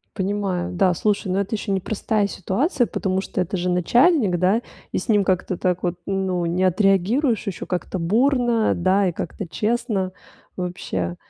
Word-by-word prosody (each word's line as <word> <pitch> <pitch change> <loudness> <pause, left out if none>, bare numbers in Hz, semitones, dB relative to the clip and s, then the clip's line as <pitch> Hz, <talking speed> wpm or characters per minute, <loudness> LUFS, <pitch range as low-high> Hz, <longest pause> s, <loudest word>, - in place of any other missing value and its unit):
Понимаю. 190 -3 -2
Да, 180 0 +3
слушай, 200 0 0
но 190 - +1
это 200 +3 -1
еще 205 0 -4
непростая 205 +2 0
ситуация, 245 - 0
потому 190 -4 -1
что 195 - -5
это 180 +1 -1
же 180 0 -1
начальник, 210 - +3
да, 190 +6 +2 0.3
и - - -1
с - - -4
ним 210 -4 +4
как-то 185 -1 0
так 180 -1 -1
вот 175 -1 0
ну 190 -2 -1
не 175 +2 0
отреагируешь, 205 - +2
еще 190 - -4
как-то 180 +1 -3
бурно, 235 +5 +2
да, 190 +3 +2
и 180 - +1
как-то 190 +3 -5
честно 210 -1 -1 0.5
вообще. 135 - -3
190 Hz, 165 wpm, -22 LUFS, 180-215 Hz, 0.5 s, ним